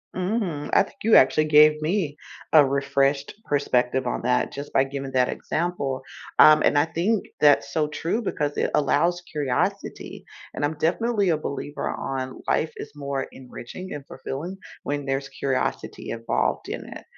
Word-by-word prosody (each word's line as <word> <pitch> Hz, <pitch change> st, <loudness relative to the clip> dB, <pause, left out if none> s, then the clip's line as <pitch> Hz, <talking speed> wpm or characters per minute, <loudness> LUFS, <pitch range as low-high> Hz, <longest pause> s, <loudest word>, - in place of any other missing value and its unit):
Mhm, 185 Hz, -6 st, -2 dB
I -, -, +6 dB
think -, -, -14 dB
you 225 Hz, -, +5 dB
actually 155 Hz, +4 st, +4 dB
gave 150 Hz, 0 st, +6 dB
me 160 Hz, -3 st, -1 dB, 0.4 s
a 155 Hz, -, +9 dB
refreshed 140 Hz, +1 st, 0 dB
perspective 130 Hz, -3 st, +1 dB
on -, -, -2 dB
that 125 Hz, +1 st, +1 dB
just 140 Hz, +1 st, -7 dB
by 135 Hz, -, +3 dB
giving 135 Hz, 0 st, -5 dB
that 130 Hz, -1 st, +3 dB
example. 155 Hz, -6 st, -2 dB, 0.4 s
Um, 155 Hz, 0 st, +8 dB
and -, -, +3 dB
I 145 Hz, -, +4 dB
think 180 Hz, +7 st, 0 dB, 0.2 s
that's 145 Hz, -1 st, +4 dB
so 155 Hz, -2 st, +1 dB
true 170 Hz, +9 st, -2 dB
because 145 Hz, -9 st, -2 dB
it -, -, 0 dB
allows 170 Hz, +5 st, +2 dB
curiosity. 140 Hz, -5 st, -2 dB, 0.3 s
And -, -, -4 dB
I'm 145 Hz, +1 st, -1 dB
definitely 200 Hz, +5 st, +1 dB
a 160 Hz, -, +2 dB
believer 145 Hz, -1 st, -4 dB
on 130 Hz, -1 st, -4 dB
life 160 Hz, -, +1 dB
is -, -, -8 dB
more 140 Hz, -1 st, -3 dB
enriching 130 Hz, +8 st, -9 dB
and 145 Hz, -2 st, -7 dB
fulfilling 170 Hz, +8 st, -6 dB, 0.3 s
when 145 Hz, 0 st, -3 dB
there's 135 Hz, 0 st, -2 dB
curiosity 135 Hz, -1 st, -3 dB
involved 115 Hz, 0 st, -1 dB
in -, -, -5 dB
it. -, -, -9 dB
145 Hz, 160 wpm, -24 LUFS, 135-160 Hz, 0.4 s, a